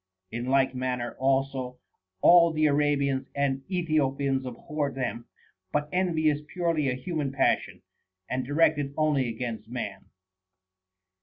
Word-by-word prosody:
In 120 +1 -4
like 135 0 +3
manner 125 -1 -3
also 135 -1 0 0.4
all 170 -1 +7
the 155 -1 +1
Arabians 140 -2 +1
and 140 -1 0
Ethiopians 140 -6 0
abhor 145 +4 -3
them. 120 -3 -4 0.5
But 150 0 -1
envy 175 -4 +1
is 150 -1 +2
purely 155 -2 -1
a 125 - -1
human 150 0 -3
passion, 135 - 0 0.4
and 130 +1 -2
directed 145 0 +1
only 150 -5 +2
against 115 -2 -5
man. 105 -5 -5
140 Hz, 125 wpm, -27 LUFS, 130-155 Hz, 0.5 s, all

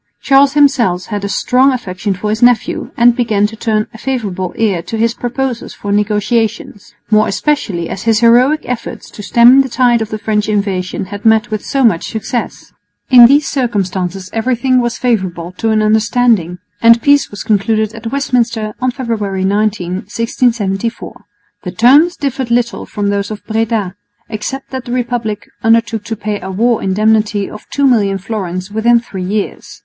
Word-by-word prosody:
Charles 275 0 +4
himself 250 -11 +2
had 205 -1 -3
a 200 - -3
strong 255 +6 +2
affection 200 -5 -3
for 210 +3 -3
his 220 - -2
nephew, 245 -1 +2
and 240 0 +5
began 220 -5 +1
to 220 +2 -4
turn 215 -1 -1
a 225 - -12
favourable 200 -9 -3
ear 200 -6 0
to 225 - -6
his 230 +1 +1
proposals 245 0 -4
for 205 - -5
negotiations, 210 +1 -1 0.2
more 215 0 +4
especially 205 - -1
as 190 - -6
his 225 -1 +2
heroic 250 +6 +4
efforts 245 -2 -6
to - - -10
stem 240 +5 +5
the 265 - -3
tide 240 -2 +2
of 220 - -3
French 210 0 -1
invasion 195 -3 -2
had 205 - -7
met 220 0 +3
with 215 -1 -3
so 275 -1 -1
much 210 -9 +2
success. 225 +2 -5 0.4
In 245 -2 +9
these 285 +3 +3
circumstances 190 -7 -2
everything 250 +2 +1
was 240 -1 -2
favourable 185 -8 -2
to 225 - 0
an 215 -1 +2
understanding; 215 -4 +1 0.2
and 230 0 +6
peace 285 -1 +3
was 205 - -8
concluded 215 0 0
at 225 0 -7
Westminster 235 -6 -1
on 255 - +1
February 215 -7 -3
19,1674. 210 +2 -1 0.5
The 180 - -6
terms 280 - +4
differed 265 -3 -3
little 235 0 -1
from 205 -2 -2
those 200 0 -2
of 215 -1 -8
Breda, 220 -4 -1 0.4
except 230 +5 -5
that 260 -2 -5
the 240 - -5
Republic 240 -4 -3
undertook 225 -1 +1
to 225 - -4
pay 210 -1 -4
a 190 - -6
war 225 +4 +1
indemnity 210 +1 +1
of 215 - -12
2,000,000 230 -9 +2 0.5
fl. 205 - -16
within 235 +2 +3
three 195 -5 -7
years. 205 +2 -4
220 Hz, 165 wpm, -14 LUFS, 205-245 Hz, 0.5 s, In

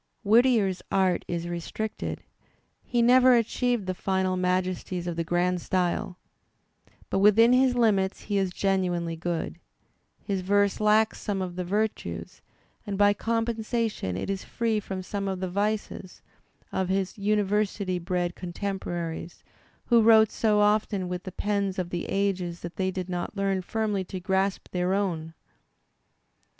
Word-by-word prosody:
Whittier's 220 -3 +3
art 190 -2 +2
is 170 -1 -3
restricted. 175 +5 -4 0.6
He 240 -1 +1
never 250 +1 +6
achieved 240 -1 0
the 185 - -1
final 190 0 0
majesties 180 -1 -1
of 175 -1 -3
the 165 - -1
grand 175 +1 0
style. 180 +1 -1 0.9
But - - +1
within 220 +4 +6
his 255 0 +4
limits 205 -5 +2
he 205 -1 -1
is 190 -2 0
genuinely 180 -3 0
good. 170 0 -3 0.6
His 195 -3 -3
verse 200 +1 +2
lacks 215 +1 +3
some 200 -2 -2
of 180 -2 -4
the 180 - -2
virtues, 175 - -3 0.4
and 200 -2 -4
by 205 0 +5
compensation 225 - -1
it 95 - -3
is 195 - -4
free 225 -2 -1
from 190 -2 -5
some 200 +1 -3
of 190 -1 -2
the 185 -1 -3
vices, 205 -1 -3 0.5
of 190 -1 -1
his 190 +1 -1
uni 210 +1 +2
versity 195 -3 -1
bred 175 -1 -1
contemporaries, 175 -2 -5 0.4
who 235 -1 +5
wrote 220 -1 +6
so 210 -2 +2
often 205 -3 +1
with 180 0 -5
the 185 - -5
pens 200 -1 -1
of 180 -1 -3
the 175 - -3
ages 185 -3 -1
that 170 0 -7
they 190 -1 0
did 185 -1 -4
not 180 +3 -4
learn 195 -1 0
firmly 210 0 -1
to 185 - -6
grasp 190 +1 -1
their 180 +1 0
own. 165 -5 -2
195 Hz, 150 wpm, -27 LUFS, 180-210 Hz, 0.9 s, never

